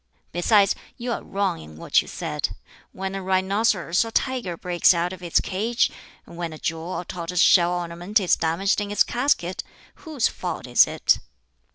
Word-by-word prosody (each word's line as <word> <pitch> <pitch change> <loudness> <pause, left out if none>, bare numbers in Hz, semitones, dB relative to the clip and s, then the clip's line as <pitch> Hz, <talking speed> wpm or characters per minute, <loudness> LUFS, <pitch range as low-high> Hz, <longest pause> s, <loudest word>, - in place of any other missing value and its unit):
Besides, 195 +3 +3 0.2
you 240 0 -4
are - - -2
wrong 195 - -2
in 75 0 -12
what - - +2
you - - -13
said. - - -3 0.4
When 190 0 -5
a 195 - -4
rhinoceros 190 0 +1
or 225 - -6
tiger 235 -7 -1
breaks 175 0 +3
out 175 +2 -1
of 185 - -10
its 175 -2 +2
cage 220 +5 0 0.3
when 170 -1 -6
a - - -8
jewel 165 +2 -4
or 180 - -4
tortoise 175 0 -4
shell 175 -2 +5
ornament 175 +4 -1
is 185 -3 +3
damaged 170 +6 0
in 205 - -4
its 205 - +3
casket 240 -9 0 0.3
whose 300 -8 -1
fault 180 - -5
is 125 -1 +5
it?" - - +2
185 Hz, 175 wpm, -24 LUFS, 170-205 Hz, 0.4 s, shell